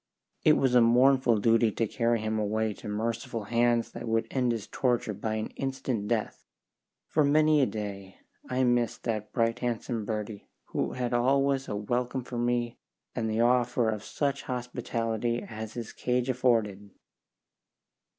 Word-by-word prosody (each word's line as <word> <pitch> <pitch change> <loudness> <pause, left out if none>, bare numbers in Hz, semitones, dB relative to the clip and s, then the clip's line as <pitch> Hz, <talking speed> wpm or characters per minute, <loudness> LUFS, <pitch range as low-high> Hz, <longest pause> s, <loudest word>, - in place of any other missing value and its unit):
It 155 - +6
was 135 -4 +2
a 125 - +7
mournful 125 0 +4
duty 115 +1 +3
to 115 - 0
carry 115 +1 0
him 110 0 -1
away 110 +1 0
to - - -11
merciful 115 +2 -3
hands 120 +1 +1
that - - -7
would 115 0 +1
end 125 -2 +1
his 115 -3 -3
torture 120 -4 0
by 110 +2 -3
an 110 0 -3
instant 130 -5 -2
death. 115 -2 -2 0.6
For 155 - +2
many 155 +1 +4
a 130 - +3
day 100 -3 -6 0.3
I 130 +1 +1
missed 120 -1 +1
that 110 -3 -3
bright, 115 0 +1
handsome 120 -1 -2
birdie 105 -1 -5 0.2
who - - -2
had 125 -1 -2
always 135 +2 +2
a 105 - -3
welcome 120 +5 -2
for 120 -1 -5
me 120 0 -1 0.3
and 115 -2 -2
the 110 +1 +1
offer 120 -1 +2
of 105 -2 -5
such 140 -2 -2
hospitality 120 -2 -2
as 110 0 -7
his 120 -2 -6
cage 125 +1 -1
afforded. 115 -6 +1
120 Hz, 160 wpm, -28 LUFS, 110-125 Hz, 0.6 s, a